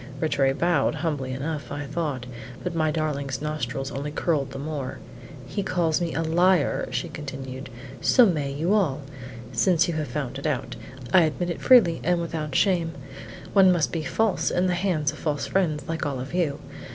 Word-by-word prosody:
Rattray 140 -4 +2
bowed, 165 -1 +1
humbly 145 -5 -2
enough, 145 +3 -4
I 145 0 -4
thought; 145 -4 -3 0.4
but - - -2
my 160 -1 +1
darling's 145 -4 -2
nostrils 140 -3 -3
only 140 +2 -4
curled 150 -2 0
the 135 - -7
more. 140 -2 -4 0.5
"He 145 +10 -3
calls 175 -3 +1
me 170 -1 -1
a 165 - 0
liar," 175 0 +2
she 125 0 -2
continued; 135 -3 -7 0.3
"so 250 - +6
may 150 -8 0
you 160 +8 0
all. 155 -9 +1 0.5
Since 170 +9 +3
you 170 - -1
have 155 -2 -2
found 135 0 -4
it 140 - -2
out, 140 -5 -2 0.4
I 185 - +8
admit 170 +2 0
it - - -6
freely 210 -11 +6
and 175 +1 +2
without 155 -4 -4
shame; 175 -5 +2 0.6
one 190 -2 +7
must 170 -4 +1
be 165 - -2
false 220 +5 +1
in 180 - +1
the 180 - +2
hands 170 -5 0
of 155 - -11
false 150 -2 -1
fiends 155 -7 0
like 165 -1 -2
all 140 -4 -2
of 130 +5 -6
you. 165 -6 0
155 Hz, 185 wpm, -25 LUFS, 140-175 Hz, 0.6 s, I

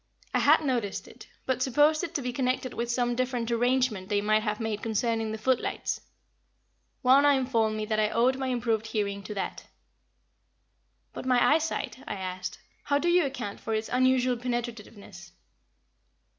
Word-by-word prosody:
I - - +3
had - - +5
noticed 235 -7 -1
it, - - -14 0.2
but 260 -1 -1
supposed 295 +5 +3
it 340 -1 -5
to 285 - -1
be 250 0 -3
connected 255 0 -1
with 235 0 -3
some 240 0 +1
different 245 -1 -1
arrangement 245 -5 +1
they 205 - +2
might 215 +1 +2
have 210 -1 -2
made 220 -2 -3
concerning 225 0 -1
the 220 - -4
footlights. 255 +3 -1 1.0
Wauna 275 +2 +6
informed 230 -5 +1
me 215 - -2
that 215 0 0
I 210 -1 +2
owed 250 +4 +2
my 265 - -2
improved 230 -3 0
hearing 200 -2 -2
to 205 +2 -7
that. 195 - -4 1.5
"But - - -6
my 250 +3 +4
eyesight," 310 -7 -1
I - - -3
asked, 185 -1 -5 0.3
"how 285 - +2
do 345 +4 +1
you 350 -2 +4
account 245 -7 -6
for 225 - -2
its 220 +1 -2
unusual 255 0 +2
penetrativeness?" 230 -6 -6
240 Hz, 165 wpm, -28 LUFS, 215-260 Hz, 1.5 s, Wauna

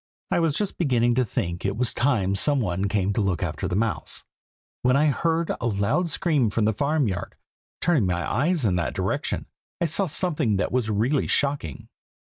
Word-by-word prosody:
I - - +3
was 165 -3 +1
just 205 -2 -2
beginning 120 -7 +2
to 130 +2 +2
think 85 -5 -3
it 100 +1 -1
was 125 -1 0
time 115 -7 +1
some 140 +8 +2
one 95 -3 -1
came 100 -1 +1
to 110 - 0
look 95 -4 0
after - - -2
the 90 - -2
mouse, 115 +1 -1 0.6
when 125 +1 +3
I 150 +2 +4
heard 165 +3 0
a 120 - 0
loud 105 - +1
scream 150 - +1
from 105 +1 0
the 110 - +2
farm 140 +4 +1
yard. 90 -3 -4 0.5
Turning 150 - +2
my 90 -1 -1
eyes 150 - +1
in 90 -4 +2
that 85 - -2
direction, - - -2 0.3
I - - +1
saw 175 +5 +1
something 150 - 0
that 100 - -1
was 125 -3 0
really 115 +7 +1
shocking. 140 - -1
120 Hz, 195 wpm, -25 LUFS, 100-150 Hz, 0.6 s, I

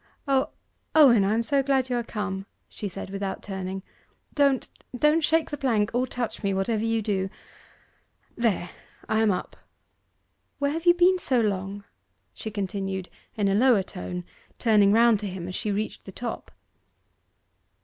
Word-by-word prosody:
'O, 270 -1 +2 0.5
Owen, 255 -9 +7
I 200 +3 +2
am 230 - +1
so 280 +3 +2
glad 265 -1 +1
you - - +2
are 240 - +1
come!' 200 -3 -4 0.2
she 210 - -6
said 190 0 -7
without 195 -1 -4
turning. 190 -1 -5 0.5
'Don't, 280 -3 +2 0.3
don't 300 +5 +3
shake 320 +1 +2
the 295 - -3
plank 225 -7 +1
or 250 +2 +1
touch 245 -2 -4
me, 200 -2 0
whatever 210 +3 0
you 225 -1 0
do.... 195 -2 -1 1.1
There, 215 -7 0 0.4
I 220 - +1
am 220 - +4
up. 180 -2 -2 1.0
Where 285 0 0
have 325 +3 -4
you 345 - +8
been 360 +1 +4
so 260 -7 +1
long?' 200 -2 -1 0.5
she 220 - -6
continued, 195 -2 -3 0.3
in 205 -2 +1
a 195 - +2
lower 225 -1 +4
tone, 180 -1 -6 0.3
turning 210 -3 +4
round 230 0 +5
to 205 -1 -4
him 180 -2 -6
as 185 - -5
she 210 - -2
reached 210 +2 -3
the 195 - -8
top. 235 +4 -6
215 Hz, 165 wpm, -26 LUFS, 195-255 Hz, 1.1 s, you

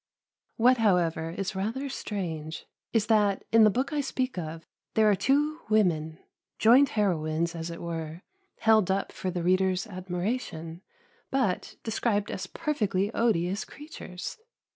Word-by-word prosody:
What, 250 +3 +5
however, 175 -7 +2
is 190 +3 -3
rather 225 +9 -2
strange 165 - -5 0.3
is 225 -3 +2
that, 210 -3 +2
in 225 0 +7
the - - +7
book 260 +7 -1
I 295 - +1
speak 260 -1 -2
of, 165 -2 -5 0.3
there 220 -1 +5
are - - +4
two 295 - +1
women 165 -7 +2 0.4
joint 250 +5 +6
heroines, 170 -4 +1
as 165 0 -5
it 170 - -7
were 165 0 -5 0.4
held 220 -4 +4
up 195 +1 0
for 185 - -4
the 175 -1 -3
reader's 185 +1 +2
admiration, 180 -3 -4 0.5
but 255 -9 -1
described 215 -2 0
as 185 0 -4
perfectly 210 - -1
odious 200 -4 +1
creatures. 290 - -8
195 Hz, 140 wpm, -28 LUFS, 170-230 Hz, 0.5 s, in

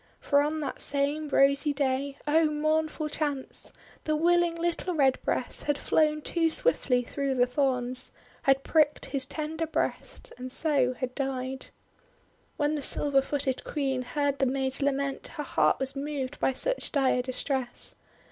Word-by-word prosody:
For 285 -1 +3
on 305 +2 -1
that 280 - -4
same 285 +2 +1
rosy 280 +2 +3
day, 275 0 -1
— - - -32
oh, 320 +2 +4
mournful 310 +1 0
chance! 290 -3 -4 0.2
— - - -25
the 310 - +1
willing 345 +1 +3
little 345 +1 -2
Redbreast 265 -3 +1
had 290 -1 +1
flown 305 +1 +1
too 330 -2 +1
swiftly 270 - +1
through 275 +2 -2
the 245 -1 +4
thorns, 255 -1 -1 0.3
had 270 0 +3
pricked 305 -2 +2
his 270 -2 -3
tender 320 +1 -3
breast, 320 - -2
and 255 0 -6
so 270 -4 +2
had 255 -1 -4
died. 265 -1 -3 0.9
When 295 0 +1
the 300 - -2
silver 280 0 +3
footed 270 -2 -2
Queen 270 -3 -1
heard 280 +2 -1
the 270 - +3
maid's 265 +1 0
lament, 275 0 -1
her 295 - -2
heart - - +2
was 265 +1 0
moved 280 -1 -4
by 265 - +2
such - - 0
dire 265 -3 +2
distress. 255 0 -1
280 Hz, 155 wpm, -28 LUFS, 265-305 Hz, 0.9 s, oh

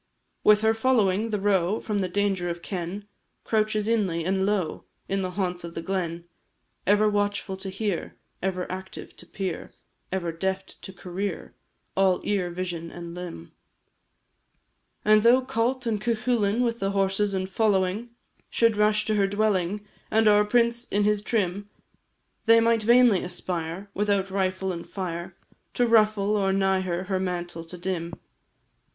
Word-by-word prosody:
With 210 0 +6
her 220 0 +4
following, 225 -3 +2
the 210 -2 -1
roe 195 0 +2
From 210 -2 -2
the 190 - 0
danger 195 -2 0
of 170 0 -5
ken 190 +2 -5 0.4
Couches 215 -1 +1
inly, 190 -8 +1
and 190 +1 +1
low, 195 -6 -1 0.2
In 195 0 -1
the 185 - -2
haunts 180 -3 -1
of 170 0 -8
the 165 - -3
glen; 170 -3 -3 0.6
Ever 205 +2 +4
watchful 205 -1 0
to 190 0 -5
hear, 195 -2 -3 0.3
Ever 185 -1 -1
active 190 0 -8
to - - -12
peer, 190 -4 -5 0.4
Ever 180 -3 -1
deft 190 +3 -4
to - - -8
career, 185 0 -5 0.4
All 190 -1 +3
ear, 195 -4 0
vision, 175 -2 -4
and 170 0 -8
limb. 175 - -8 1.5
And 215 0 +6
though 240 +4 +6
Cult 255 0 -1
and 215 -3 -1
Cuchullin, 230 -1 +1
With 235 -1 -1
their 195 - 0
horses 195 +1 +1
and 185 0 -1
following, 200 +2 +1 0.4
Should 230 -2 +3
rush 210 0 +3
to 220 - +1
her 200 -2 +3
dwelling, 205 -1 0 0.2
And 220 0 +3
our 210 0 +6
prince 235 +2 +2
in 205 +1 +1
his 210 0 +2
trim, 205 -2 -1 0.8
They 230 0 +7
might 230 0 +3
vainly 235 -3 +5
aspire 180 +1 -4
Without 200 -1 0
rifle 190 0 -1
and 170 - -8
fire 175 -1 -5 0.4
To 245 - +3
ruffle 215 -3 +3
or 195 -1 +1
nigh 190 -1 +2
her, 180 -1 -2
Her 190 0 -1
mantle 175 -2 -3
to 180 +2 -9
dim. 175 -2 -3
195 Hz, 155 wpm, -26 LUFS, 185-215 Hz, 1.5 s, They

